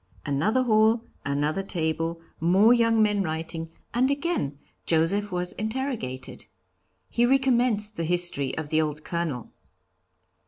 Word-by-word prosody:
Another 200 - +1
hall, 220 0 +3 0.2
another 145 +5 0
table, 165 -2 -2 0.2
more 190 +8 +5
young 230 -2 +3
men 210 -1 +2
writing, 160 -1 -4 0.2
and 255 +3 +2
again 280 - -1 0.3
Joseph 185 +6 +1
was 180 0 -1
interrogated. 215 - -4 0.6
He 240 - 0
recommenced 240 -5 +2
the 165 - -1
history 175 -5 +1
of 160 -2 -5
the 160 0 +3
old 150 -1 -3
Colonel. 165 -8 -3
180 Hz, 120 wpm, -26 LUFS, 160-225 Hz, 0.6 s, more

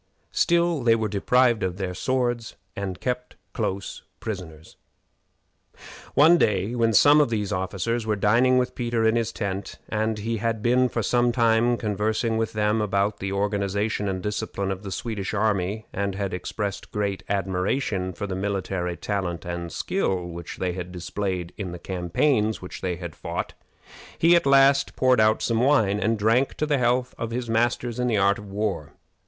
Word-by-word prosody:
Still, 170 -3 +2
they 115 -1 +4
were 110 -1 -1
deprived 120 +3 +2
of 90 -1 -2
their 95 -2 -3
swords 120 +2 -1 0.2
and 95 -2 -4
kept 125 0 -3 0.2
close 95 +1 -3 0.2
prisoners. 85 -7 -7 1.4
One 165 +4 +6
day, 100 +2 +1
when 115 -2 +2
some 145 +7 +6
of 145 - +2
these 105 -3 -2
officers 100 +5 -2
were 105 - +2
dining 120 +6 +3
with 125 0 0
Peter 120 -2 -1
in 110 +1 +3
his 115 -1 0
tent, 100 -3 -4
and 110 0 -1
he 115 +2 -2
had 115 0 -2
been 125 +1 +3
for 115 - -2
some 120 +3 +2
time 115 0 +3
conversing 110 +2 -1
with 115 - -1
them 105 +1 +1
about 100 0 0
the 100 0 -3
organization 100 +1 -1
and 95 -1 -3
discipline 100 -1 -2
of 95 -1 -4
the 100 -2 -7
Swedish 105 -2 -3
army, 105 0 0
and 100 -1 -2
had 100 -1 -3
expressed 100 +2 -4
great 100 -2 -2
admiration 95 +1 -1
for 100 +3 -5
the 100 - -4
military 95 -2 -2
talent 90 -6 -3
and 85 -1 -4
skill 90 +3 -1
which 85 -1 -7
they 90 -1 -1
had 90 0 -6
displayed 90 0 -4
in 95 -4 -5
the - - -6
campaigns 105 - 0
which 90 - -9
they 90 -2 -1
had 85 -2 -7
fought, - - -4 0.6
he 170 +1 +5
at 170 -4 +2
last 135 0 +5
poured 130 -2 +3
out 110 0 +3
some 115 -1 +1
wine 110 -7 +3
and 110 +3 +1
drank 115 +6 +2
to 155 - -1
the 145 -3 +1
health 125 +1 +1
of 115 - -2
"his 120 +1 -3
masters 120 +1 0
in 125 - +1
the 115 -3 +1
art 100 0 +3
of 105 -1 -10
war." 100 -7 -3
105 Hz, 175 wpm, -25 LUFS, 95-120 Hz, 1.4 s, One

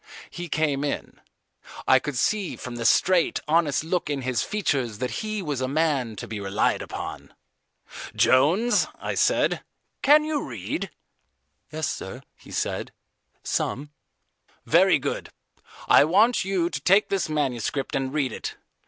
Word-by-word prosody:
He 175 -1 -6
came 145 -3 0
in. 145 - -4 0.7
I 130 - +6
could 145 -1 -4
see 205 +7 0
from 125 -1 -7
the 115 - -4
straight, 180 +8 +3
honest 155 -2 +2
look 165 -1 -1
in 140 -2 -2
his 125 -4 0
features 135 - -1
that 125 +3 -3
he 215 -2 -3
was 145 -5 -3
a 130 - 0
man 140 -6 0
to - - -7
be 105 0 -5
relied 100 +1 0
upon. - - -7 0.8
"Jones," 170 - +4
I - - -3
said, - - +2 0.4
"can 300 +2 +6
you 305 -1 -1
read?" - - -4 0.8
"Yes, 155 -1 -2
sir," 125 +8 -6
he - - -18
said, - - -3 0.5
"some." 145 +3 -2 0.7
"Very - - +5
good. - - -4 0.6
I - - +7
want 210 +9 +4
you 185 -3 0
to 140 - -4
take 195 +7 +4
this 195 -5 -1
manuscript 135 -3 -1
and 135 -1 -1
read 140 -4 0
it. - - -5
150 Hz, 145 wpm, -25 LUFS, 130-185 Hz, 0.8 s, I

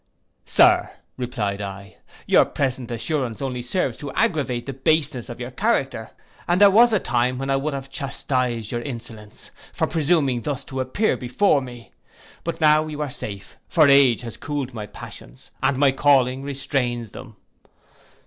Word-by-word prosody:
'Sir,' - - +4 0.3
replied 110 -6 -3
I, 100 0 -8 0.3
'your - - +5
present 130 -3 -2
assurance 120 0 -2
only 130 -3 -3
serves 125 +10 -1
to 145 -2 -6
aggravate 145 - 0
the 135 - -5
baseness 140 -2 0
of 120 - -8
your 125 +1 -6
character; 135 - -1 0.4
and 175 +1 +2
there 205 -1 +8
was 235 +4 +6
a 215 - +3
time 125 -2 0
when 135 +1 -2
I - - +3
would 140 +2 -2
have 135 0 -6
chastised 125 -5 -2
your 120 - -2
insolence, 115 -4 -9 0.2
for - - 0
presuming 150 -6 +1
thus 140 +1 -3
to 135 - -6
appear 130 +12 0
before 140 +5 +2
me. 120 -3 -10 0.5
But 170 - -4
now 155 0 +4
you 150 -1 -6
are 145 - -5
safe; 100 -5 -7
for 155 -4 +4
age 140 -4 +5
has 115 -2 -8
cooled 140 -4 -4
my 105 -3 -6
passions, - - -12
and 135 - +1
my 140 0 +4
calling 135 -2 +3
restrains 135 -4 -2
them. 125 -4 -11
130 Hz, 165 wpm, -22 LUFS, 120-145 Hz, 0.5 s, there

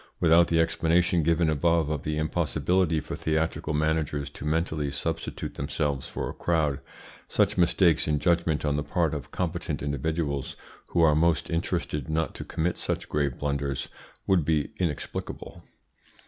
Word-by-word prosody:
Without 85 +1 +5
the 80 - +2
explanation 85 +1 +2
given 85 +1 +2
above 80 +1 +2
of 75 -3 -2
the 75 0 -2
impossibility 80 +1 +1
for 75 - -6
theatrical 80 0 -1
managers 75 -2 0
to 75 - -9
mentally 80 -2 0
substitute 80 +4 -3
themselves 70 -1 -2
for - - -4
a - - -5
crowd, 80 -5 0 0.5
such - - +2
mistakes 85 -2 +3
in 75 -1 +2
judgment 85 -2 +1
on 75 -1 +1
the 75 - -1
part 80 +1 0
of 70 -4 -5
competent 85 -4 -3
individuals, 70 0 -2 0.3
who 85 - +1
are 80 -2 +6
most 80 +2 +2
interested 85 -4 -2
not 80 +1 0
to - - -7
commit 85 +2 -2
such - - -2
grave 70 -4 0
blunders, 70 -2 -2 0.4
would 95 -4 +3
be 75 -1 0
inexplicable. 85 -6 -4
80 Hz, 150 wpm, -27 LUFS, 75-85 Hz, 0.5 s, are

